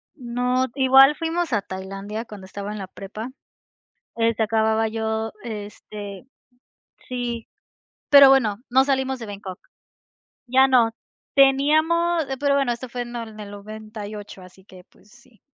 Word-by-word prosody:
No, 250 0 0
igual 270 +1 +6
fuimos 330 -2 -2
a 210 - +2
Tailandia 195 +4 -6
cuando 205 -4 -11
estaba 200 +2 -6
en 210 - -6
la 190 - -6
prepa, 210 +5 -8 0.9
eh, 230 0 +2
se 220 - -1
acababa 220 0 +2
yo 220 0 -2
este, 205 -1 -8 0.8
sí, 240 -2 -4 0.6
pero 280 -1 +10
bueno, 235 -7 +4
no 260 +2 +5
salimos 265 -1 0
de 230 - -7
Bangkok. 200 -3 -8 0.9
Ya 265 +2 +5
no, 240 -3 +4 0.4
teníamos 315 +5 +3
pero 280 0 +2
bueno, 270 -4 +1
esto 245 +2 -8
fue 245 +1 -4
en, 240 0 -7
en 220 -2 -7
el 205 -1 -8
98, 210 -1 -9
así 185 +1 -16
que, 185 -2 -15
pues, 205 - -26
sí, 240 0 -22
230 Hz, 145 wpm, -23 LUFS, 210-265 Hz, 0.9 s, pero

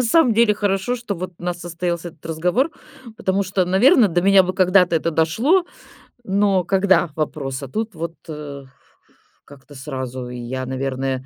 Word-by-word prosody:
На - - +3
самом 250 +2 +4
деле 225 -1 +4
хорошо, 205 +3 -1
что 235 -4 -4
вот 185 0 -6
у - - -16
нас 175 0 -3
состоялся 175 0 -3
этот 160 -2 -18
разговор, 180 - 0 0.5
потому 190 +1 0
что, 185 0 0
наверно, 220 - +5
до 175 0 0
меня 195 0 +6
бы 185 0 -3
когда-то 185 -2 +4
это 165 +1 -1
дошло, 220 - +2 0.6
но 195 -2 +2
когда- 190 -1 +2
вопрос. 145 -3 -3
А - - -5
тут 220 - -4
вот, 165 +1 -5
э, 145 -2 -7 0.8
как-то 145 0 -16
сразу. 130 -2 -6
И 125 - -7
я, 130 +2 -4
наверное 130 0 -3
175 Hz, 170 wpm, -21 LUFS, 145-200 Hz, 0.8 s, меня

